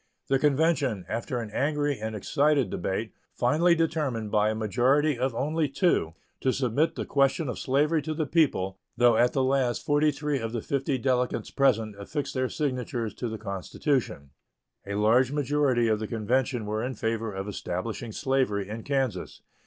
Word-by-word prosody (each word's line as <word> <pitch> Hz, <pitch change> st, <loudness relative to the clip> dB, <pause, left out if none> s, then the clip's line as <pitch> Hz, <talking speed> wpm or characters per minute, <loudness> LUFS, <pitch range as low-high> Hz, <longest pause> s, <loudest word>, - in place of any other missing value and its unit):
The 135 Hz, 0 st, +3 dB
convention, 140 Hz, -, +1 dB
after 120 Hz, +4 st, -3 dB
an 110 Hz, -3 st, -6 dB
angry 145 Hz, +1 st, 0 dB
and 110 Hz, 0 st, -4 dB
excited 140 Hz, +2 st, +1 dB
debate, 95 Hz, +5 st, -3 dB, 0.2 s
finally 160 Hz, +8 st, +3 dB
determined, 150 Hz, -10 st, -1 dB
by 105 Hz, 0 st, +3 dB
a 110 Hz, -, -1 dB
majority 130 Hz, +7 st, +2 dB
of 125 Hz, 0 st, -1 dB
only 150 Hz, +4 st, 0 dB
two, 140 Hz, -, +1 dB, 0.3 s
to 130 Hz, -, +1 dB
submit 135 Hz, +5 st, 0 dB
the -, -, -3 dB
question 140 Hz, +3 st, +1 dB
of 125 Hz, -, -4 dB
slavery 150 Hz, +4 st, +2 dB
to 155 Hz, +1 st, -4 dB
the 155 Hz, 0 st, -1 dB
people, 130 Hz, -, +1 dB, 0.2 s
though 120 Hz, -1 st, +5 dB
at 120 Hz, +2 st, +3 dB
the 135 Hz, -, +1 dB
last 130 Hz, -2 st, +1 dB
forty 145 Hz, +1 st, +3 dB
three 145 Hz, 0 st, -1 dB
of 115 Hz, -1 st, -4 dB
the 115 Hz, -, -2 dB
fifty 135 Hz, -1 st, -1 dB
delegates 125 Hz, 0 st, 0 dB
present 115 Hz, -6 st, +2 dB
affixed 145 Hz, +8 st, -4 dB
their 130 Hz, -1 st, 0 dB
signatures 125 Hz, -6 st, -2 dB
to 120 Hz, -, -4 dB
the 110 Hz, -, -5 dB
constitution. 100 Hz, -, -2 dB, 0.6 s
A 100 Hz, -, -3 dB
large 115 Hz, +5 st, +3 dB
majority 145 Hz, -4 st, +1 dB
of 110 Hz, -1 st, +1 dB
the 110 Hz, -, -4 dB
convention 120 Hz, +2 st, 0 dB
were 110 Hz, +1 st, -2 dB
in 130 Hz, +1 st, -3 dB
favor 115 Hz, 0 st, -2 dB
of 95 Hz, 0 st, -5 dB
establishing 105 Hz, +4 st, -4 dB
slavery 130 Hz, -7 st, 0 dB
in 110 Hz, +2 st, -5 dB
Kansas. 135 Hz, -2 st, -2 dB
130 Hz, 170 wpm, -27 LUFS, 110-145 Hz, 0.6 s, though